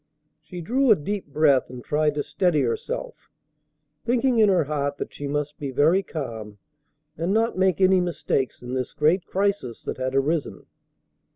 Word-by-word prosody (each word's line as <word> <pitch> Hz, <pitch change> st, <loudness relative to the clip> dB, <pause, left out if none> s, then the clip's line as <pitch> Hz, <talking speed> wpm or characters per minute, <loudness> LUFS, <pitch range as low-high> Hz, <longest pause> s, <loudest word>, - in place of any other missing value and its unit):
She 180 Hz, -2 st, -9 dB
drew 255 Hz, +10 st, +1 dB
a 215 Hz, -, +8 dB
deep 200 Hz, +4 st, -4 dB
breath, 145 Hz, -2 st, +3 dB
and 125 Hz, -1 st, -9 dB
tried 150 Hz, 0 st, +1 dB
to 145 Hz, -, -1 dB
steady 155 Hz, +1 st, +1 dB
herself, 475 Hz, -, -4 dB, 0.7 s
thinking 245 Hz, 0 st, +2 dB
in 215 Hz, -2 st, +6 dB
her 185 Hz, -4 st, +3 dB
heart 145 Hz, -1 st, -2 dB
that -, -, -6 dB
she 145 Hz, -, -6 dB
must 145 Hz, +1 st, -3 dB
be 140 Hz, -, -4 dB
very 155 Hz, +8 st, +3 dB
calm 115 Hz, -, -6 dB, 0.6 s
and 170 Hz, +3 st, 0 dB
not 225 Hz, +2 st, +1 dB
make 185 Hz, -1 st, +2 dB
any 185 Hz, -1 st, +4 dB
mistakes 150 Hz, -8 st, -2 dB
in 125 Hz, +1 st, -6 dB
this 130 Hz, -1 st, -3 dB
great 165 Hz, +5 st, +2 dB
crisis 195 Hz, -, -1 dB
that -, -, -4 dB
had 130 Hz, +1 st, -2 dB
arisen. 145 Hz, +3 st, -1 dB
155 Hz, 170 wpm, -24 LUFS, 140-190 Hz, 0.7 s, a